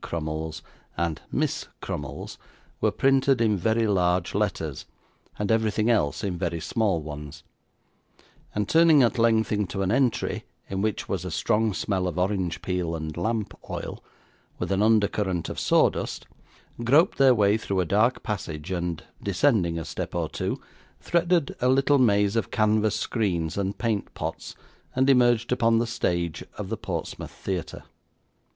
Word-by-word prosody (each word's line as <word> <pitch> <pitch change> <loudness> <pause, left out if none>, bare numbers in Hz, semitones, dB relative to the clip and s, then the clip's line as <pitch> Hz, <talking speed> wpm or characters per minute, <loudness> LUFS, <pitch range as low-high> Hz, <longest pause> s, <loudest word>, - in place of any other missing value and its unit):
Crummles, 80 0 -4 0.3
and 85 -1 -1
Miss - - -1
Crummles, 70 -2 -6 0.4
were - - +3
printed 135 -1 +3
in 110 -2 +3
very 110 +4 +1
large 90 -3 +1
letters, 95 -8 -2 0.5
and 105 +1 -1
everything 110 0 +2
else 105 -2 +1
in 90 -4 -2
very 85 -2 -1
small 95 -3 0
ones; 75 -1 -8 1.1
and, 105 -1 0
turning 160 -2 +6
at 120 +1 +1
length 115 -1 +3
into 100 -2 -1
an 95 - 0
entry, 125 -1 +1 0.2
in 95 0 -3
which 110 0 -1
was 95 -3 -2
a 90 - -4
strong 110 +6 +1
smell 95 -1 -1
of 90 - -4
orange 90 -3 -1
peel 90 -3 -1
and 80 -1 -5
lamp 110 +3 -2 0.2
oil, - - -5 0.5
with - - -3
an 95 +1 +2
under 110 -1 +4
current 95 -6 -2
of - - -4
sawdust, - - +1 0.6
groped 145 +10 +4
their 135 -2 +6
way 105 -1 +4
through 100 -3 -2
a 90 - +2
dark 110 +8 +2
passage, 85 -5 -4
and, 90 -1 -2 0.2
descending 100 -4 +2
a 80 - -4
step - - -5
or - - 0
two, - - -3 0.4
threaded 170 -3 +1
a 125 - +3
little 135 +2 +4
maze 105 -3 +3
of 115 - 0
canvas 110 -1 +2
screens 90 -9 -1
and 100 0 -2
paint 110 -4 -1
pots, - - -5 0.4
and 130 +1 +4
emerged 120 -2 +3
upon 115 -2 +3
the 115 - +2
stage 85 -7 -1
of - - -5
the - - -2
Portsmouth - - -5
Theatre. 95 -3 -5
100 Hz, 155 wpm, -26 LUFS, 85-115 Hz, 1.1 s, turning